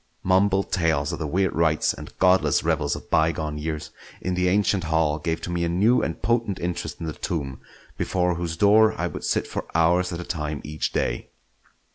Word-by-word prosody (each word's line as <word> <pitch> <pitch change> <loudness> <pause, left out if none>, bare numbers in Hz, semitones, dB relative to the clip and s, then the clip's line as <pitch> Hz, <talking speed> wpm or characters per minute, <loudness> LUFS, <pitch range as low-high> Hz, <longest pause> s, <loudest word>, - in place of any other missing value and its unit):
Mumbled 95 +1 +2
tales 80 -3 +1
of 85 - -4
the 80 - -2
weird 95 +5 0
rites 80 -1 +2
and - - -11
godless 90 -6 +3
revels - - 0
of - - -11
bygone 80 -1 +1
years 75 0 -4 0.3
in 90 - -2
the 90 0 +1
ancient 95 -1 +1
hall 80 -1 +1
gave 80 +1 -2
to 85 - -5
me 85 0 -1
a 85 - 0
new 105 +9 +3
and 80 - -4
potent 115 -3 0
interest 85 0 -4
in - - -5
the 80 - -3
tomb, 70 -8 -4 0.4
before 90 -1 +1
whose 85 -1 -4
door 110 +3 +5
I - - 0
would - - -5
sit - - 0
for - - -5
hours 85 +3 +3
at 85 - -4
a - - -4
time 75 -4 -3
each 75 +1 -3
day. - - -2
85 Hz, 200 wpm, -24 LUFS, 80-95 Hz, 0.4 s, door